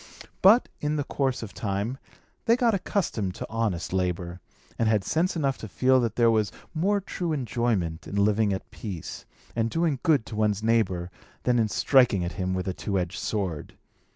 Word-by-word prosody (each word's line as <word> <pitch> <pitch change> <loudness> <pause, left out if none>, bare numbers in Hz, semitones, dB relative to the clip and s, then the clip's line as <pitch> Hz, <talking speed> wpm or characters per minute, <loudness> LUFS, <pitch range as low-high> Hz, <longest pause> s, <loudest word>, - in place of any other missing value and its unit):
But, 215 +6 +7
in 150 +1 -1
course 135 -3 -1
of 105 - -8
time, 105 +5 -2 0.5
they 230 - +5
got 240 -2 +2
accustomed 135 - -1
to - - -5
honest 105 -7 -1
labour, 90 -1 -2 0.4
and 115 -1 +3
had 105 -3 +2
sense 170 - 0
enough 140 -5 0
to 110 - -6
feel 130 +6 +3
that 115 -3 -1
there 115 -1 +4
was 110 -4 +1 0.2
more 195 +6 +2
true 175 -3 -3
enjoyment 110 - -1
in - - -6
living 105 +1 +3
at 95 - -4
peace, 95 -8 -7 0.3
and 115 0 +1
doing 160 -1 0
good 145 -9 +3
to 110 - -7
one's 105 -1 +1
neighbour, 95 -6 +1 0.3
than 125 -1 +3
in 110 - +3
striking 120 -5 +3
at 85 - -3
him 95 -1 -2
with 95 0 -3
a 95 - -1
two 100 +2 -2
edged 90 0 -2
sword. 95 -8 -3
110 Hz, 180 wpm, -26 LUFS, 95-135 Hz, 0.5 s, But